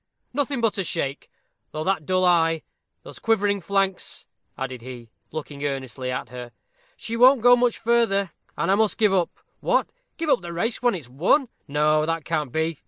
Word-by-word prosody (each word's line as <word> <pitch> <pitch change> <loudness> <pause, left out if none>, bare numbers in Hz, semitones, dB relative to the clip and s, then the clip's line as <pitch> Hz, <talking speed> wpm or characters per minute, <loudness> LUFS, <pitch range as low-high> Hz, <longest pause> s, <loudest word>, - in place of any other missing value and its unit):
"Nothing 280 -2 -1
but 225 -3 +1
a - - +1
shake; 145 -5 -3 0.4
though 155 - -4
that 175 -4 -1
dull 185 0 +2
eye 165 -2 +3 0.4
those - - -11
quivering 205 -3 +1
flanks 195 +1 -1 0.2
" - - -48
added 130 -2 -5
he, 120 -2 -10 0.2
looking 145 -2 -6
earnestly 130 -2 -3
at 125 -1 -3
her. 125 0 -8 0.4
"She 230 - -5
won't 255 +2 +6
go 245 0 +8
much 245 -1 +1
further, 225 -5 +2 0.3
and 170 +5 +1
I - - +5
must 215 +1 +2
give 210 -3 +3
it - - +4
up 180 -2 +2 0.3
what! - - +1 0.3
give 330 - -3
up 285 - +3
the 170 -1 -7
race 225 +8 0
just - - -7
when 245 -4 +2
it's 155 -9 -7
won? 185 - +2 0.2
No, 155 +1 +2
that 165 -2 -2
can't 150 -5 -1
be. 160 0 -1
175 Hz, 195 wpm, -24 LUFS, 145-220 Hz, 0.4 s, go